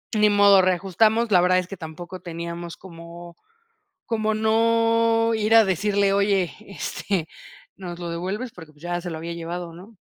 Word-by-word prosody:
ni 210 Hz, 0 st, +4 dB
modo, 200 Hz, -1 st, +6 dB
reajustamos. 200 Hz, +5 st, +1 dB
La 180 Hz, -, +6 dB
verdad, 185 Hz, 0 st, +3 dB
es 180 Hz, -, -5 dB
que 195 Hz, -, -8 dB
tampoco 175 Hz, +3 st, -9 dB
teníamos 170 Hz, 0 st, -6 dB
como 170 Hz, -1 st, -12 dB, 0.7 s
como, 220 Hz, -1 st, -1 dB
no, 230 Hz, +1 st, +2 dB
ir 220 Hz, +1 st, +1 dB
a 225 Hz, -, +7 dB
decirle: 200 Hz, +1 st, +1 dB
"Oye, 200 Hz, -3 st, +1 dB
este, 195 Hz, -3 st, -4 dB, 0.5 s
¿nos 175 Hz, -2 st, -8 dB
lo 175 Hz, -1 st, -5 dB
devuelves?" 195 Hz, +8 st, -4 dB
Porque, 160 Hz, -3 st, -13 dB
pues, 150 Hz, +2 st, -23 dB
ya 175 Hz, 0 st, -3 dB
se 175 Hz, 0 st, -6 dB
lo 160 Hz, -, -5 dB
había 170 Hz, +1 st, -6 dB
llevado, 170 Hz, 0 st, -6 dB
¿no? 195 Hz, +5 st, -14 dB
185 Hz, 165 wpm, -23 LUFS, 170-215 Hz, 0.7 s, a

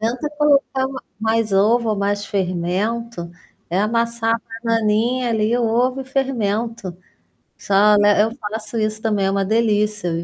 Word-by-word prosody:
Tenta 245 Hz, +7 st, -2 dB
colocar 290 Hz, -3 st, +2 dB
m 270 Hz, -, -8 dB, 0.2 s
mais 220 Hz, -1 st, 0 dB
ovo 220 Hz, +4 st, +3 dB
ou -, -, +1 dB
mais 205 Hz, +1 st, -1 dB
fermento. 190 Hz, +2 st, -2 dB, 0.4 s
É 175 Hz, -, -1 dB
amassar 230 Hz, +1 st, 0 dB
a 230 Hz, -, -4 dB, 0.2 s
bananinha, 230 Hz, +2 st, +1 dB
ali, 220 Hz, 0 st, +1 dB
o -, -, 0 dB
ovo 245 Hz, +3 st, +1 dB
e -, -, -3 dB
o -, -, -22 dB
fermento. 230 Hz, -, -2 dB, 0.6 s
Só 205 Hz, +1 st, +4 dB
le 205 Hz, 0 st, +4 dB
eu 225 Hz, +2 st, -1 dB
faço 215 Hz, 0 st, -5 dB
isso 215 Hz, 0 st, -2 dB
também. 210 Hz, -3 st, 0 dB
É -, -, +1 dB
uma 195 Hz, 0 st, 0 dB
delícia. 210 Hz, -2 st, +1 dB
220 Hz, 160 wpm, -20 LUFS, 205-235 Hz, 0.6 s, Só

